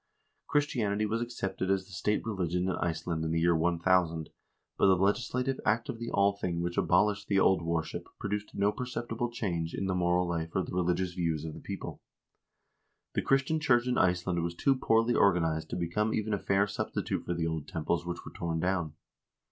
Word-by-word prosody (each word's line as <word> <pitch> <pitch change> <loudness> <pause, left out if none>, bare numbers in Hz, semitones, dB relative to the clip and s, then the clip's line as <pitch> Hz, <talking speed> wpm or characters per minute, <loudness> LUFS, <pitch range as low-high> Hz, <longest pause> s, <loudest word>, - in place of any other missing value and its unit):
Christianity 115 -8 +1
was 110 +2 -1
accepted 95 -6 -3
as 95 -1 +1
the 100 - -17
state 95 +5 -1
religion 90 -5 -1
in - - +1
Iceland 85 -1 -2
in 80 - -1
the 80 +1 +1
year 85 +1 +3
1000, 85 -1 +1 0.4
but - - +4
the 95 - +6
legislative 125 +7 0
act 115 +2 +1
of 115 - -4
the 120 0 -4
Althing 100 -3 +1
which 85 0 -2
abolished 100 +3 +2
the 100 -2 +3
old 95 -2 +4
worship 85 -1 -2
pro 100 - -5
duced 105 0 -3
no 100 +1 +2
perceptible 120 -1 -3
change 85 -8 -2
in 100 - -2
the 95 - 0
moral 90 0 +2
life 85 -1 -3
or 95 - +2
the - - -7
religious 90 0 0
views 80 -3 -1
of 80 - -5
the - - -9
people. - - -6 1.1
The - - +1
Christian 135 +4 +2
church 125 -5 +3
in 125 -1 +1
Iceland 90 -1 +2
was 85 +1 -3
too 135 +9 +3
poorly 115 -1 +2
organized 80 -6 +2
to - - -3
become 90 +6 0
even 110 0 -1
a 100 - 0
fair 100 +1 +2
substitute 105 - -3
for 85 - -2
the 85 -1 -1
old 80 -2 -3
temples 85 +1 -1
which 85 0 -5
were - - -9
torn 85 -1 -2
down. 90 -3 0
95 Hz, 195 wpm, -30 LUFS, 85-105 Hz, 1.1 s, the